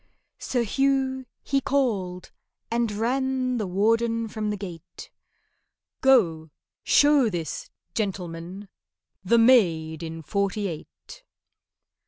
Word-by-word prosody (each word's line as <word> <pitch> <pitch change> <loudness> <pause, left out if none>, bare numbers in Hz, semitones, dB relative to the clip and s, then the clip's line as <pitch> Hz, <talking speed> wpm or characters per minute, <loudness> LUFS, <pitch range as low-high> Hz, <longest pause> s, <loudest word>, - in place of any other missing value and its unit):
SIR 245 -2 -1
HUGH 265 +2 0 0.2
he 275 -1 0
called—and 230 -1 -2
ran 255 +3 -1
The 210 - -2
warden 230 +4 +1
from 215 -1 -3
the 210 - -2
gate: 180 -5 -10 0.9
"Go, 170 -12 +3 0.3
show 290 -5 +4
this 170 -6 -5 0.2
gentleman 185 -1 -4 0.6
The 235 +5 +3
maid 170 -10 +3
in 165 0 -6
Forty 200 +3 -1
eight." 185 - -10
215 Hz, 95 wpm, -25 LUFS, 180-255 Hz, 0.9 s, show